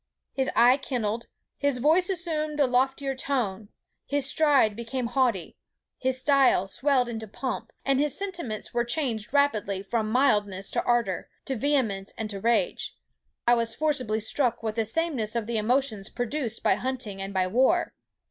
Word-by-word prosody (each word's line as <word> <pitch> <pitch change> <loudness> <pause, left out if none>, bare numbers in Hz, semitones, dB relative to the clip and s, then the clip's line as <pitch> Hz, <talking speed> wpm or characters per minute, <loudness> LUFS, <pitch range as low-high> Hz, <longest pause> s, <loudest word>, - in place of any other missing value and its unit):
His 265 -1 0
eye 245 +3 +6
kindled; 235 -5 -3 0.3
his 285 -2 +1
voice 320 +9 +3
assumed 315 -4 -1
a 285 - +5
loftier 265 +2 +1
tone; 225 -7 -2 0.4
his 285 -1 +1
stride 285 -8 +3
became 235 +2 -4
haughty; 240 -6 0 0.4
his 260 0 +1
style 270 -8 +3
swelled 255 +4 +1
into 225 -2 -5
pomp, 255 +5 -5
and 270 -1 +2
his 295 -1 0
sentiments 345 - -4
were 240 0 +1
changed 235 -4 -1
rapidly 215 -9 +1
from 215 +1 -2
mildness 205 -7 +1
to - - 0
ardour, 235 -6 0 0.2
to 265 - -2
vehemence, 225 -7 0
and 220 -2 -3
to 200 - -5
rage. 235 - 0 0.5
I 240 - +5
was 230 -1 +1
forcibly 255 -8 0
struck 240 +2 +1
with 220 -1 -1
the 225 0 -1
sameness 240 -4 -1
of 230 -2 -1
the 230 0 -1
emotions 220 -3 +1
produced 245 -1 -2
by - - +4
hunting 245 -7 -3
and 195 0 -5
by 190 -1 +1
war. 260 - +2
245 Hz, 160 wpm, -26 LUFS, 220-280 Hz, 0.5 s, eye